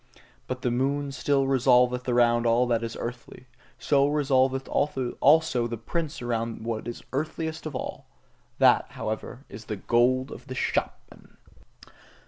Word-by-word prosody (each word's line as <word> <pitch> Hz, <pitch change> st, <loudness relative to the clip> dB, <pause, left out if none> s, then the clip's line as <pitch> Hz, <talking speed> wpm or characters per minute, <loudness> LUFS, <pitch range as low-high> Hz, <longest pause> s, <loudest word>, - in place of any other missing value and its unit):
But 130 Hz, 0 st, -5 dB
the 125 Hz, -, +1 dB
moon 140 Hz, +3 st, -1 dB
still 135 Hz, +1 st, +1 dB
revolveth 125 Hz, -1 st, +3 dB
around 120 Hz, -1 st, +3 dB
all 120 Hz, +2 st, +3 dB
that 120 Hz, -2 st, +1 dB
is 115 Hz, 0 st, -5 dB
earthly: 120 Hz, +1 st, -7 dB, 0.3 s
so 140 Hz, -1 st, +2 dB
revolveth 135 Hz, -2 st, +1 dB
also 135 Hz, -1 st, +2 dB
the 115 Hz, 0 st, -5 dB
prince 155 Hz, +4 st, -4 dB
around 115 Hz, -1 st, -3 dB
what 115 Hz, -1 st, -3 dB
is 120 Hz, -, -6 dB
earthliest 160 Hz, +2 st, -3 dB
of 150 Hz, -, -7 dB
all -, -, -6 dB, 0.5 s
that, -, -, +4 dB
however, 110 Hz, +5 st, -5 dB
is 110 Hz, +2 st, -10 dB
the 105 Hz, -, -4 dB
gold 125 Hz, +6 st, +2 dB
of 125 Hz, -, -10 dB
the 130 Hz, -, -6 dB
shopman. -, -, -4 dB
125 Hz, 140 wpm, -26 LUFS, 120-140 Hz, 0.5 s, that